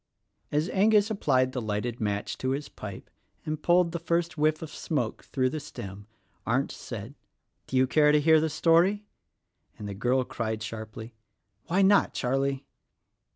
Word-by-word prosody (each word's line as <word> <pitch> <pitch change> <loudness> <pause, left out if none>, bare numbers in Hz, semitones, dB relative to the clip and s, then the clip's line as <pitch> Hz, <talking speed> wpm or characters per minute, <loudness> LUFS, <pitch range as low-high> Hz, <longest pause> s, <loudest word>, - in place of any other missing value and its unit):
As 150 +3 +1
Angus 210 +2 +3
applied 130 -10 +2
the 125 -1 -3
lighted 110 +2 -3
match 105 -1 -2
to 130 - -1
his 145 +1 -4
pipe 100 -3 -9 0.4
and 155 -1 -3
pulled 175 0 +3
the 170 - -3
first 170 +1 -1
whiff 155 +1 +1
of 155 - -8
smoke 130 -10 -3
through 130 -2 0
the 155 - -3
stem 100 -8 -9 0.4
Arndt 130 +5 0
said, 115 +2 -7 0.5
"Do 130 - -1
you 130 - +5
care 150 +3 +4
to 150 - +5
hear 160 +1 +5
the 160 - 0
story?" 175 +7 +3 0.7
and 105 - -7
the 100 - -4
girl 125 +6 +1
cried 110 -3 -4
sharply, 110 +1 -7 0.5
"Why 190 +3 +3
not, 200 +1 +4
Charlie?" 135 +2 -1
140 Hz, 160 wpm, -28 LUFS, 115-165 Hz, 0.7 s, you